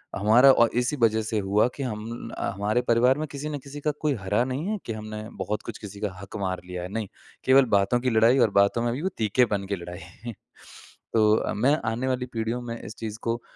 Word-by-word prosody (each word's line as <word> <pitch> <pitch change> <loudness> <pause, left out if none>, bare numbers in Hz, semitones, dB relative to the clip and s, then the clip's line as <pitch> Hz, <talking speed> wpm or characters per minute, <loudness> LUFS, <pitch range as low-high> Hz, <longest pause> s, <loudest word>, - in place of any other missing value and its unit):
हमारा 115 +7 +6
और 120 -3 +4
इसी 125 +4 -1
वज़ह 110 -1 +3
से 110 0 -1
हुआ 100 +4 +2
कि 140 - -4
हम 115 0 -5
हमारे 105 +5 0
परिवार 125 +4 +4
में 155 - -2
किसी 145 +2 -5
न 145 - -3
किसी 140 +2 -9
का 150 - +1
कोई 150 -2 +2
हरा 105 +5 +1
नहीं 135 +8 -3
है 215 0 -1
कि 115 - -3
हमने 110 0 -6
बहुत 100 +3 -2
कुछ - - -7
किसी 100 -1 -9
का 105 -3 -1
हक 100 - -8
मार 95 -1 -2
लिया 90 -1 -5
है। 90 - -6
नहीं, 110 -3 -2 0.4
केवल 130 0 +6
बातों 100 +5 +2
की 125 - +1
लड़ाई 115 +4 +5
और 115 - +5
बातों 100 +4 +2
में 120 - +1
भी 140 - -4
वो 190 - +1
तीखेपन 105 -2 +1
के 100 - -1
लड़ाई। 90 +6 -9 0.8
तो 110 -1 +3
मैं 130 +8 +3 0.2
आने 125 +3 -2
वाली 125 -1 -1
पीढ़ियों 115 +2 -2
में 115 -1 -6
इस 105 - -9
चीज़ 110 0 -6
को 115 0 -1
115 Hz, 225 wpm, -26 LUFS, 105-125 Hz, 0.8 s, हमारा